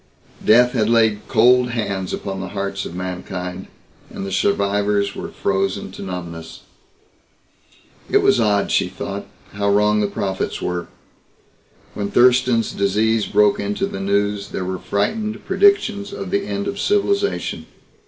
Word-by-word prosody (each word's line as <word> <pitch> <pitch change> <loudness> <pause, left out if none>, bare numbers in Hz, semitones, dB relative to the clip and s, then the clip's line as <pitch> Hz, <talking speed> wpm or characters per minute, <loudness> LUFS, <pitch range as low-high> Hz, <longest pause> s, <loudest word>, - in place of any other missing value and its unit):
Death 125 +3 +5
had 110 -4 +1
laid 110 -3 +2
cold 125 +1 +4
hands 100 -6 -3
upon 95 -1 -4
the 95 - -5
hearts 100 0 -4
of 85 - -9
mankind 90 0 -5 0.4
and - - -6
the 95 - -5
survivors 100 +1 +1
were - - -5
frozen 95 0 -1
to - - -10
numbness. 85 -3 -7 1.5
It - - +3
was - - +4
odd, 105 -3 +2
she - - +2
thought, 100 +2 -6 0.3
how 100 0 0
wrong 105 +1 +3
the 105 - +1
prophets 95 -1 -3
were. 90 -1 -3 1.1
When 100 -1 -3
Thurston's 125 -2 +3
Disease 105 +3 +1
broke 105 -1 +3
into 100 0 -1
the 95 - -6
news 100 +1 0
there 95 - -4
were 95 0 -3
frightened 215 - -2
predictions 225 - +2
of 95 -2 -6
the - - 0
end 100 -1 -3
of 200 - -4
civilization. 405 - 0
100 Hz, 145 wpm, -20 LUFS, 95-115 Hz, 1.5 s, Death